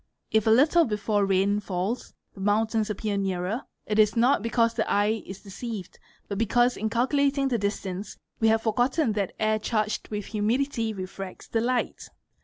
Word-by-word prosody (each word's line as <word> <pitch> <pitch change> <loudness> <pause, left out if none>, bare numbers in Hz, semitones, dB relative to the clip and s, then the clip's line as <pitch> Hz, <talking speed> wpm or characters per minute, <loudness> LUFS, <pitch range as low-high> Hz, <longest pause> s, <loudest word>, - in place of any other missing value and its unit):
If 220 0 +2
a - - +6
little 300 +9 +5
before 210 -2 0
rain 195 +2 +2
falls, 195 +4 -3 0.2
the - - -14
mountains 215 +2 +1
appear 210 0 -2
nearer, 195 +4 -1 0.2
it 210 0 0
is 210 -1 +5
t 230 - +1 0.2
because 230 +1 +2
the - - -1
eye 210 +2 +2
is 190 0 -9
deceived 205 -1 -7 0.3
but 200 -1 -4
because 240 +2 +3
in 220 +2 -2
calculating 275 +3 +1
the 240 -3 0
distance 200 -1 -3 0.2
we 225 - +4
ye 220 - +5
forgotten 245 +4 +1
that 200 -3 -2
air 215 0 +2
charged 215 -1 -1
with 210 -2 -4
humidity 230 +2 0
refracts 190 -1 -7
the 225 - 0
light. 245 +1 -1
215 Hz, 170 wpm, -26 LUFS, 200-235 Hz, 0.3 s, a